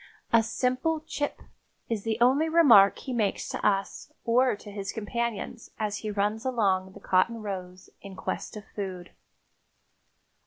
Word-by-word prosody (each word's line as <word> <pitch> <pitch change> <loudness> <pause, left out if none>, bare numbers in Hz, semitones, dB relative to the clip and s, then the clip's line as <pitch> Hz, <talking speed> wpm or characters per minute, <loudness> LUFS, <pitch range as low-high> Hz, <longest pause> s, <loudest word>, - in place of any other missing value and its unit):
A 230 - +7
simple 255 +7 0
"chip" 295 -2 -4 0.4
is 225 -3 -2
the 220 +1 -1
only 270 +7 +4
remark 250 - +7
he 260 - -6
makes 215 -5 0
to - - -5
us 195 -1 0
or 245 +1 +3
to 205 0 -11
his 200 -1 -4
companions 230 +1 -4
as 210 -1 -2
he 215 - -5
runs 210 +2 -1
along 195 -7 +1
the - - -12
cotton 210 +5 +2
rows 185 -2 -7
in 195 -1 -10
quest 215 - -4
of 210 - -9
food. 185 -3 -6
215 Hz, 150 wpm, -27 LUFS, 200-245 Hz, 0.4 s, A